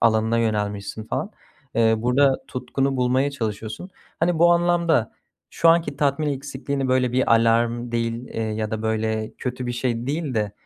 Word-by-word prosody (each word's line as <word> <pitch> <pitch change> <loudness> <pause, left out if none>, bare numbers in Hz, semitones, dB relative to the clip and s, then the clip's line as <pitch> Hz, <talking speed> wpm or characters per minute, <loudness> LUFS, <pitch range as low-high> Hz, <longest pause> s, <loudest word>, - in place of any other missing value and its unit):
alanına 110 0 +3
yönelmişsin 105 -1 -2
falan. - - -3 0.4
Eee, 110 -1 +4
burada 130 +4 +3
tutkunu 135 +2 -2
bulmaya 130 +3 +2
çalışıyorsun. 110 - -5 0.3
Hani, 170 0 +2
bu 175 +1 +6
anlamda 170 -7 +2 0.4
şu 165 - +2
anki 165 0 +3
tatmin 145 +1 +1
eksikliğini, 135 0 -3
böyle, 130 -1 +2
bir 130 -1 +1
alarm 115 +1 +2
değil, 115 +1 -2
eee, 115 - -4
ya 110 0 -2
da 110 0 -3
böyle, 110 0 -1
kötü 125 -1 -4
bir 120 - -2
şey 120 -1 -2
değil 145 -2 -2
de 105 -2 -1
120 Hz, 160 wpm, -23 LUFS, 110-140 Hz, 0.4 s, bu